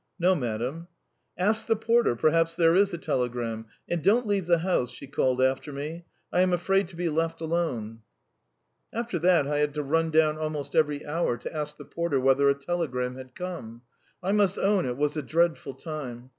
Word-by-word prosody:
"No, 185 +1 +4
madam." 125 +3 -3 0.5
"Ask 215 +4 +1
the 225 - +3
porter; 230 - +2
perhaps 165 +5 +2
there 165 -1 +4
is 200 +1 +4
a 170 - -3
telegram. 120 -5 -2 0.2
And 175 -1 -1
don't 230 +7 +4
leave 200 -4 0
the 170 -1 +5
house," 165 -8 0
she 140 - -9
called 130 -2 0
after 130 +3 +1
me. 155 +5 -6 0.3
"I 180 - +4
am 185 -1 +3
afraid 195 +2 +2
to 180 - -13
be 175 +1 -1
left 165 +1 -1
alone." 155 -10 -2 0.9
After 230 -6 -3
that 175 -3 +4
I 145 +1 0
had 150 0 0
to 150 - -1
run 165 +3 +1
down 155 -1 +3
almost 150 -2 -4
every 150 -2 +2
hour 150 -5 0
to 120 - -7
ask 150 -1 -4
the 145 - -10
porter 170 -2 -1
whether 135 +2 +4
a 140 - +3
telegram 140 -5 -2
had 130 -1 -11
come. 125 -11 -7 0.4
I 190 - 0
must 205 -2 +2
own 195 -5 +2
it 125 0 -3
was 150 +1 0
a - - 0
dreadful 160 -2 0
time! 130 -6 -7
155 Hz, 195 wpm, -27 LUFS, 135-175 Hz, 0.9 s, the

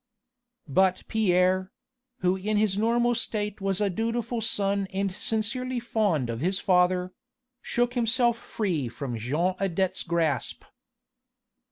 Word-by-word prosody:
But 185 +5 +2
Pierre 185 -3 +2 0.5
who 180 0 +2
in 210 +3 -1
his 210 -2 +2
normal 235 +3 +2
state 210 -3 -2
was 195 0 0
a 205 - +2
dutiful 230 +4 -2
son 200 -3 +1
and 195 0 -1
sincerely 240 +6 -1
fond 210 - 0
of 115 +1 -4
his 185 +4 0
father 180 0 +2 0.5
shook 245 0 0
himself 240 0 +2
free 185 - -2
from 120 +1 -5
Jean 150 +12 0
Adet's 190 0 0
grasp. 165 -6 -1
195 Hz, 125 wpm, -27 LUFS, 180-225 Hz, 0.5 s, But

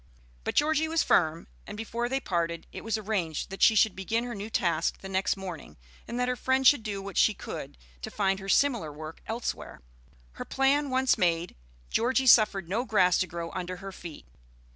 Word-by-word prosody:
But - - -3
Georgie 315 +1 +2
was 325 0 +1
firm, 160 -1 +2 0.2
and - - -7
before 235 +2 -3
they 265 +1 0
parted 170 -7 -2
it - - -8
was 225 -1 -1
arranged 190 -7 -3
that 195 - -7
she 225 - +6
should 215 -1 +4
begin 225 +5 -1
her 245 -1 -5
new 205 0 -6
task 170 -6 0
the 195 - -7
next 190 +1 0
morning, 175 - -8 0.3
and 240 - -4
that 250 - +1
her 250 - 0
friend 260 +1 0
should 260 -1 +6
do 200 -3 -5
what 200 0 -7
she 215 - +4
could - - -7 0.2
to - - -5
find 195 -1 0
her 195 0 -7
similar 235 - +2
work 155 +2 -9
elsewhere. 230 +1 -5 0.5
Her - - -8
plan 275 +2 +1
once 260 0 +2
made, 170 -1 0 0.4
Georgie 260 +3 +1
suffered 215 -7 +5
no 210 +7 -1
grass 185 -7 +3
to 185 - 0
grow 170 0 -6
under 185 0 -4
her 195 +1 -8
feet. 170 - -10
200 Hz, 200 wpm, -28 LUFS, 175-245 Hz, 0.5 s, she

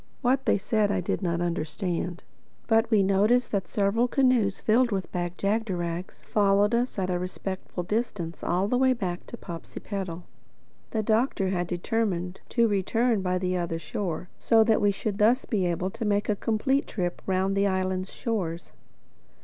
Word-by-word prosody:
What 260 +2 +2
they - - +4
said 205 +1 +1
I 200 - +1
did 180 - -2
not 170 -2 -1
understand; 175 +1 -2 0.4
but 225 0 +3
we 215 -4 +4
noticed 210 +6 +3
that 200 -3 -1
several 210 +4 +1
canoes 245 -7 +2
filled 240 +3 +3
with 195 -4 -3
Bag 175 0 -3
jagderags 185 -5 -2
followed 205 +1 +3
us 240 0 0
at 185 -1 0
a 180 - 0
respectful 185 0 -5
distance 190 -5 -3
all 180 +3 +1
the 250 +3 +1
way 260 0 +4
back 185 -7 -4
to 235 - -8
Popsipetel. 175 0 -6 0.7
The 220 -1 -1
Doctor 220 -3 +1
had 180 -2 -1
determined 180 0 -1
to 235 -2 +3
return 220 +2 +1
by 185 -1 0
the 185 0 -1
other 170 -2 -2
shore, 170 +2 -4
so 225 -1 +5
that 220 0 +3
we 205 - +4
should 200 +1 -2
be 210 - +2
thus 245 +5 +4
able 185 -3 0
to 230 - -5
make 205 0 +1
a 210 - +3
complete 265 +7 0
trip 175 -4 -3
round 190 +1 +1
the 200 0 +3
island's 185 0 -1
shores. 180 -9 -3
195 Hz, 170 wpm, -27 LUFS, 180-225 Hz, 0.7 s, so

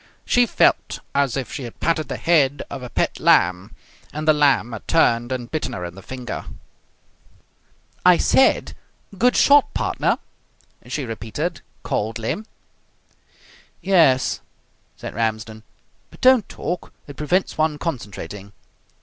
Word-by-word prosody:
She 245 0 +3
felt - - +2 0.2
as 140 -2 +1
if 130 - -4
she - - -5
had 120 -3 -9
patted 160 -2 0
the - - -4
head 145 -5 +2
of 135 - -6
a 125 - -7
pet - - -1
lamb, 90 +1 +2 0.4
and 155 +1 -5
the 155 - +7
lamb 140 -6 +2
had 115 - -8
turned 120 -6 +2
and 120 -2 -4
bitten 155 -1 -3
her 90 - -5
in 85 - -7
the 95 - -12
finger. 125 +3 -6 1.6
"I 180 -1 +6
said, 265 - +3 0.4
'Good 245 +6 +3
shot, 285 -1 +5
partner!'" - - 0 0.7
she 145 - -3
repeated 115 +8 -4 0.2
coldly. 110 +1 -2 1.4
"Yes," 160 -9 +3 0.6
said - - -7
Ramsden, 110 -1 -3 0.5
"but - - -17
don't 255 -5 +4
talk. 175 +1 -5
It 145 - -11
prevents 175 +7 0
one 155 -1 +1
concentrating." 105 - -6
135 Hz, 130 wpm, -21 LUFS, 115-165 Hz, 1.6 s, the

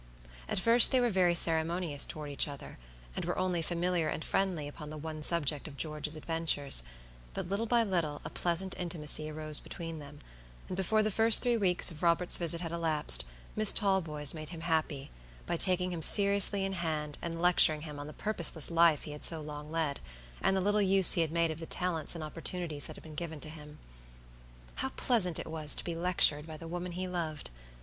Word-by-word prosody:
At - - -3
first 230 +4 +7
they 260 - +2
were 245 -1 0
very 180 -3 +1
ceremonious 165 -2 +2
toward 150 -2 -8
each 140 - 0
other, 140 - -11 0.4
and - - -5
were - - -4
only 180 -2 -2
familiar 175 0 -2
and 160 - -5
friendly 180 -7 -3
upon 150 +1 -11
the 155 - -9
one 155 0 -8
subject 150 -2 -1
of 140 -2 -13
George's 150 0 -4
adventures; 155 - +2 0.5
but - - -5
little 200 +5 -3
by 235 0 +1
little 170 -8 -3
a - - -7
pleasant 180 +2 0
intimacy 155 -3 +2
arose 155 -1 -4
between 165 -2 -9
them, 145 0 -13 0.5
and - - -6
before 215 +4 0
the 215 - -2
first 225 +2 +4
three 245 -1 0
weeks 185 -5 +2
of 160 - -12
Robert's 175 0 +2
visit 170 -1 0
had 165 -2 -6
elapsed, 155 - +1 0.3
Miss 215 -1 +6
Talboys 165 -8 0
made 155 -2 -9
him 165 -2 -10
happy, 155 -4 -3 0.3
by - - -3
taking 180 +1 +1
him 170 -2 -6
seriously 200 +1 +6
in 195 - -5
hand 155 -4 -4
and 165 -1 -6
lecturing 165 -3 +4
him 150 -2 -9
on 145 - -8
the 150 - -10
purposeless 170 -7 +2
life 165 -3 +2
he 150 - -9
had 150 - -10
led - - -2
so 165 - 0
long, 150 0 -5 0.5
and 195 - 0
the - - -1
little 205 +2 0
use 195 -1 +6
he 170 - 0
had 160 -2 -2
made 170 -1 -1
of 160 - -8
the 165 - -9
talents 175 -2 -1
and 165 - -7
opportunities 165 -1 -3
that - - -10
had - - -15
been 155 - -13
given 160 -1 -7
to 155 - -4
him. 150 -1 -13 1.0
How 265 - -4
pleasant 215 -11 0
it - - -6
was 155 -2 +4
to - - -2
be 170 - -5
lectured 165 -3 +1
by 155 -1 -9
the 165 - -11
woman 175 +1 -7
he 185 +1 -5
loved! 160 - -6
165 Hz, 205 wpm, -29 LUFS, 155-180 Hz, 1.0 s, first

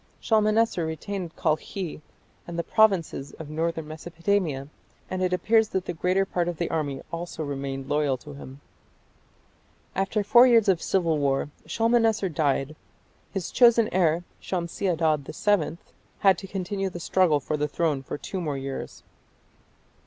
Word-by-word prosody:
Shalmaneser 215 -3 +2
retained 165 +2 -4
Kalkhi 160 +1 -2 0.5
and 170 -1 -6
the 170 - 0
provinces 185 -11 +2
of 155 -2 -9
northern 160 0 -2
Mesopotamia, 165 -2 -2 0.4
and 185 0 -2
it 185 -1 +1
appears 220 +5 +3
that 190 -1 -2
the - - -3
greater 185 +3 +1
part 175 -2 -1
of 175 -2 -3
the 170 - -2
army 145 -4 -2
also 170 -1 -5
remained 135 -2 -4
loyal 145 -3 +1
to 145 +3 -11
him. 140 0 -11 1.3
After 200 +2 0
four 240 +5 +7
years 230 -4 +5
of 185 -4 +3
civil 165 -5 +1
war 140 0 0 0.2
Shalmaneser 225 -3 +2
died. 145 -2 0 0.6
His 195 -4 -4
chosen 235 -2 +5
heir, 170 -2 +2 0.2
Shamshi 180 +1 -3
Adad 160 -4 +1
VII, 185 -6 +1 0.4
had 195 -2 +6
to 195 - -8
continue 195 +1 -3
the 175 - -7
struggle 175 -3 +3
for 150 +2 -3
the 150 0 0
throne 150 -2 0
for 135 - -6
two 185 +5 -5
more 150 -4 -2
years. 135 0 -6
170 Hz, 150 wpm, -26 LUFS, 150-195 Hz, 1.3 s, four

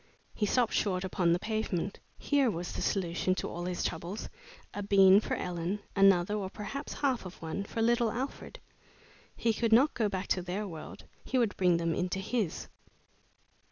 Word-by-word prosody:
He 210 - 0
stopped 240 +1 +2
short 185 -3 0
upon 180 -2 +1
the 170 - +4
pavement. 205 -2 -2 0.2
Here 280 -3 +2
was 175 -3 -4
the - - -5
solution 185 -1 0
to - - -3
all 175 +1 -5
his 180 -1 -2
troubles: 185 +5 -4 0.4
a 205 - -4
bean 195 -1 +6
for - - -2
Ellen; 175 +2 -2 0.2
another, 195 -1 +5
or 200 -3 -2
perhaps 215 +9 -6
half 265 -4 0
of 185 -1 -10
one, 165 +4 -4
for 225 +2 -2
little 235 0 +3
Alfred! 260 +5 -5 0.8
He 230 - +1
could 230 +1 0
not 260 +7 +5
go 220 -4 0
back 190 -1 -3
to 185 - +1
their 185 +4 -3
world; 160 -4 -9 0.2
he 260 - -1
would 230 -4 +2
bring 180 -2 +3
them 165 -1 0
into 180 +3 -1
his! 195 -2 -2
195 Hz, 180 wpm, -31 LUFS, 180-225 Hz, 0.8 s, bean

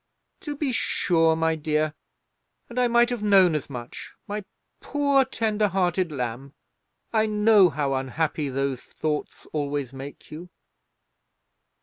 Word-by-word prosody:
"To 295 -1 -5
be 290 -2 -1
sure, 165 -8 +2
my 160 0 +1
dear; 155 0 0 0.8
and 240 +1 -3
I 250 - +4
might 240 +1 +3
have 240 -3 -2
known 195 -5 +5
as 150 -1 -3
much, 120 -3 -8
my 205 0 -4 0.4
poor 280 -2 +2
tender 215 -5 0
hearted 185 -2 0
lamb. 130 0 -5 0.6
I 220 -1 +3
know 210 -3 +5
how 140 -2 -1
unhappy 140 +3 -1
those 135 -1 -2
thoughts 150 -1 -4
always 145 -3 -2
make 135 +2 -10
you." 170 +4 -9
165 Hz, 130 wpm, -25 LUFS, 145-215 Hz, 0.8 s, known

